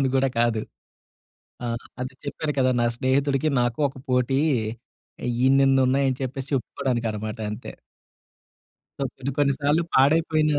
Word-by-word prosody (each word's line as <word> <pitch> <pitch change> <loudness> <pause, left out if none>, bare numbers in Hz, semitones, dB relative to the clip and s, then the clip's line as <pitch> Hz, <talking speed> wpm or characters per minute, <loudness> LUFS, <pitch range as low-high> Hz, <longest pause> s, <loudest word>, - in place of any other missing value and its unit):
విందామని 135 - +2
గూడా 135 0 +3
కాదు. 115 -2 +2 1.0
ఆ! 120 - -2 0.3
అదే 130 +1 -4
చెప్పాను 150 +1 -3
కదా! 130 0 +3
నా - - +3
స్నేహితుడికి, 135 +3 +1
నాకు 120 +1 0
ఒక 135 - -12
పోటీ. 125 +1 +2 1.1
ఇన్నిన్నున్నాయని 135 0 +4
చెప్పేసి 135 +1 -4
చెప్పుకోడానికనమాట 115 -5 -2
అంతే. 105 - -7 1.3
సో, - - -2
కొన్ని 135 +2 -3
కొన్ని 140 -1 +4
సార్లు 150 +3 +2
పాడైపోయినా, 155 +1 +3
135 Hz, 120 wpm, -24 LUFS, 125-140 Hz, 1.3 s, ఇన్నిన్నున్నాయని